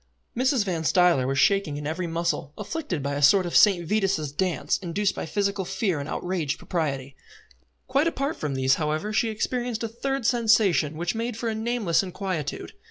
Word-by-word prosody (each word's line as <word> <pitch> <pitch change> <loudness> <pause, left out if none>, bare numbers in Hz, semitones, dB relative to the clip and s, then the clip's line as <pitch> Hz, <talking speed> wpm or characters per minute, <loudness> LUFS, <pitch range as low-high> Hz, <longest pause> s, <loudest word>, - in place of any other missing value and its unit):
Mrs. 255 -2 +2
Van 170 -4 -2
Stuyler 170 -6 +3
was 135 +1 -1
shaking 195 -4 +2
in 145 - -6
every 170 +4 -2
muscle, 165 -3 -2
afflicted 210 - -4
by 140 0 -2
a 145 - -2
sort 185 +6 +5
of 175 - -4
St. 180 -5 +5
Vitus' 190 -7 0
dance 180 +4 -1
induced 195 +2 -1
by - - -5
physical 200 +2 -1
fear 190 -3 -1
and 140 +2 -5
outraged 175 -6 -2
propriety. 140 -6 -3 0.7
Quite 275 +5 +2
apart 280 -2 -1
from 145 -3 -3
these, 130 0 +3
however, 155 +8 -1
she 225 +2 +2
experienced 240 +1 -2
a - - 0
third 270 +3 -3
sensation 215 - +3
which 175 +1 -1
made 230 0 -3
for 230 0 -2
a - - -1
nameless 220 -6 +1
inquietude. 185 -5 -4
185 Hz, 180 wpm, -25 LUFS, 155-220 Hz, 0.7 s, sort